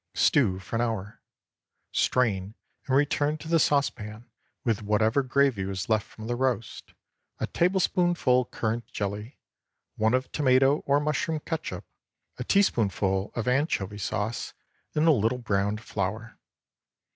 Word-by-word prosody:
Stew 105 -10 +3
for 95 +4 -4
an - - +1
hour. 110 -4 -3 0.7
Strain 105 -5 +1 0.3
and 130 - +2
return 145 +1 +2
to 155 - -10
the 165 0 +3
saucepan, 120 -6 0 0.3
with 115 -2 0
whatever 110 +5 +2
gravy 130 -5 +2
was 95 +1 -4
left 110 -1 +1
from 110 - -11
the 120 +1 -1
roast, 120 -3 -2 0.4
a - - -1
tablespoonful 175 -7 +2
currant 115 0 -3
jelly, 105 +5 -5 0.6
one 110 +3 +3
of 130 0 -2
tomato 135 0 +4
or 140 +1 +4
mushroom 150 +1 -1
catsup, 155 - -5 0.5
a - - -2
teaspoonful 100 - +1
of 120 0 -3
anchovy 125 - 0
sauce, 105 +3 -3 0.4
and 155 +2 +3
a - - +8
little 115 -2 +2
browned 105 -2 -1
flour. 110 +2 -4
120 Hz, 135 wpm, -27 LUFS, 105-140 Hz, 0.7 s, a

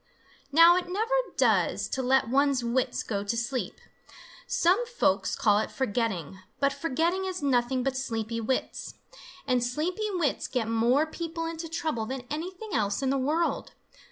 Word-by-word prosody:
Now 335 +4 +7
it 360 -1 -3
never 440 +6 -1 0.2
does - - +2
to 265 - -2
let 260 -1 +3
one's 275 0 +2
wits 245 +2 0
go 200 -3 -2
to 205 +3 -2
sleep. 245 +2 -3 0.7
Some 370 +8 +3
folks 195 - +1
call 205 -1 +3
it 220 - -2
forgetting, 205 - -2 0.2
but 280 0 +2
forgetting 330 +6 0
is 370 -4 -4
nothing 255 -1 +1
but 270 0 -1
sleepy 230 -3 -3
wits. 255 +4 -3 0.5
And 250 -3 +2
sleepy 340 - -1
wits 345 -7 0
get 245 -4 -1
more 235 +6 +3
people 330 +1 -5
into 330 0 -5
trouble 315 -9 -2
than 260 0 -5
anything 365 +7 -5
else 205 +2 0
in 265 - +1
the 275 - +1
world. 310 +6 0
270 Hz, 155 wpm, -28 LUFS, 235-330 Hz, 0.7 s, Now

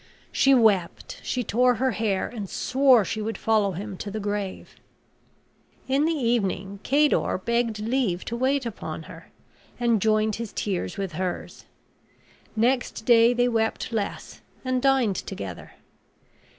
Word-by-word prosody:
She 275 0 +4
wept, 205 -8 +1
she 250 - -2
tore 250 +3 +3
her 260 +2 +1
hair, 210 -3 -1
and 210 -5 -7
swore 255 -5 +3
she 215 - -3
would 220 +1 -3
follow 215 -3 +1
him 195 +2 -6
to 205 - -6
the 215 +2 -4
grave. 205 -2 -4 1.1
In 275 +3 +2
the 330 - +2
evening 200 - -1
Cador 290 -4 +2
begged 235 +2 -1
leave 220 -6 -1
to 235 - -4
wait 260 +2 +1
upon 230 -3 -6
her, - - -13 0.5
and 235 -4 +2
joined 215 0 +2
his 230 -2 -6
tears 200 +1 -3
with 195 -2 -3
hers. 180 +2 -5 0.9
Next 245 0 0
day 235 -1 +6
they 245 0 +2
wept 225 -1 -1
less, 210 -3 -4 0.2
and 255 0 0
dined 260 -8 +2
together. 95 -3 -7
225 Hz, 140 wpm, -25 LUFS, 200-250 Hz, 1.1 s, day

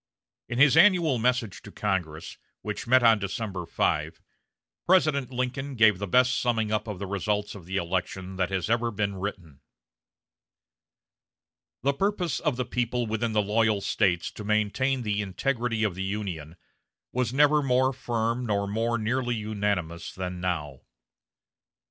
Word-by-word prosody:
In 120 - -3
his 140 +2 +6
annual 170 - +5
message 120 -4 0
to - - -12
Congress, 90 -6 -3 0.2
which - - -5
met 130 +1 +5
on 115 -2 +6
December 100 -2 -4
5, - - -1 0.7
President 155 -8 +3
Lincoln 130 +2 -3
gave 110 -5 +5
the 100 - -3
best 125 +5 +3
summing 115 -3 0
up 110 +1 -1
of 105 -3 -5
the 100 - -5
results 105 +2 -2
of 95 -5 -11
the 95 +1 -2
election 95 +1 -3
that 95 -1 0
has 95 -3 -2
ever 115 +1 +1
been 100 -2 -2
written: 90 -6 -6 2.2
"The 140 +1 +2
purpose 180 -3 -1
of 150 -5 0
the 125 0 -2
people 120 0 -1
within 110 +1 -2
the 105 -1 +2
loyal 110 0 +2
States 90 -4 0
to 105 - -9
maintain 110 +5 0
the 105 -1 -1
integrity 115 +3 -1
of 105 -4 +1
the 95 - -6
Union 95 -6 -4 0.6
was 125 -2 -1
never 150 +2 +4
more 130 0 +2
firm 120 -1 -2
nor 100 -1 0
more 115 +3 0
nearly 120 +2 -1
unanimous 100 -6 -2
than 90 -1 -4
now.... 75 -7 -3
110 Hz, 150 wpm, -27 LUFS, 95-125 Hz, 2.2 s, his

